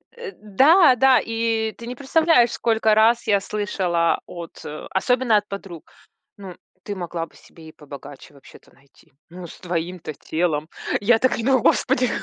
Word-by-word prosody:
Э, 475 -4 -8
да 270 - +4
да, 260 0 +5
и 225 -1 -2
ты 235 - -10
не 250 - -6
представляешь, 280 -2 +2
сколько 220 -2 +1
раз 230 +3 +3
я 205 -2 +3
слышала 185 -5 -1
от 170 -1 -10 0.3
особенно 245 +3 +2
от 205 0 -3
подруг. 195 -5 -9 0.5
Ну, 190 -3 -10 0.3
ты 205 - -5
могла 175 -2 -5
бы 165 - -24
себе 160 -1 -17
и - - -13
побогаче 145 -2 -12
вообще-то 140 -2 -18
найти. 140 +2 -26 0.2
Ну, 175 +1 -10
с - - -14
твоим-то 175 -2 -5
телом. 155 0 -2 0.3
Я 225 +2 +3
так 255 - +1
и 230 - -4
говорю: 260 -3 +2
"Господи!" 250 -1 +2
210 Hz, 160 wpm, -22 LUFS, 170-240 Hz, 0.5 s, да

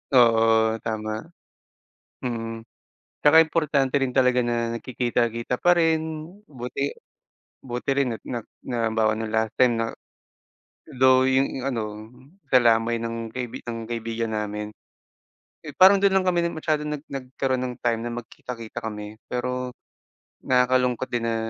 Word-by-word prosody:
Oo, 115 -2 +4
tama. 110 -1 -3 1.0
Mm. 115 -2 -4 0.6
Tsaka 160 +2 +7
importante 145 -4 +1
rin 135 - +1
talaga 125 -1 +4
na 120 -1 -1
nagkikita-kita 120 -1 -1
pa 175 0 +5
rin, 160 -1 +1 0.2
buti 140 +1 -4 0.6
buti 125 0 -5
rin 135 -4 +1
at 105 - -14
na 120 - -4 0.2
na 120 -3 -1
halimbawa 110 -1 +1
no'ng 110 - -3
last 110 -1 +1
time 125 -2 +5
na 115 0 -1 1.1
though 130 0 +6
yung 130 0 +1
ano, 110 -3 -4 0.4
sa 130 - +7
lamay 115 0 +3
ng 115 -1 -4
kaibi 125 -2 -5
ng 115 -1 -5
kaibigan 115 -1 -3
namin, 105 0 -3 0.9
eh, 150 - -10
parang 190 +1 +7
do'n 195 -1 +4
lang 190 - +3
kami 175 -2 +2
masyadong 150 -2 -2
nag 145 - -15
nagkaroon 130 -1 -2
ng 125 -1 -4
time 115 -1 +1
na 120 +1 -4
magkita-kita 115 -1 -7
kami. 105 0 -7
Pero 125 0 -3 0.6
nakakalungkot 125 0 +1
din 115 -1 -1
na, 115 - 0
120 Hz, 135 wpm, -24 LUFS, 115-135 Hz, 1.1 s, Tsaka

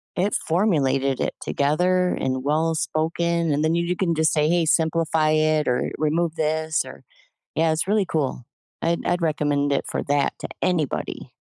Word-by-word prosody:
it 195 +3 0
formulated 140 -7 +1
it - - -1
together 180 +6 +1
and 130 -5 -2
well 160 +3 +1
spoken, 165 +2 0
and 145 +1 +1
then 160 +1 +2
you 170 0 +1
you 180 +1 -1
can 175 -2 0
just 160 -1 +2
say, 150 -1 +2
"Hey, 170 -1 +2
simplify 160 -1 +2
it 155 -1 +2
or 125 - 0
remove 160 +2 0
this 155 0 0
or" - - -11 0.5
Yeah, 160 +1 +2
it's 160 +3 -1
really 205 -1 +2
cool. 135 -7 -2 0.3
I'd 170 +1 -1
I'd 175 0 0
recommend 145 -2 0
it 140 - 0
for - - -3
that 145 0 +1
to - - -5
anybody. 165 -7 -2
160 Hz, 175 wpm, -23 LUFS, 150-170 Hz, 0.5 s, then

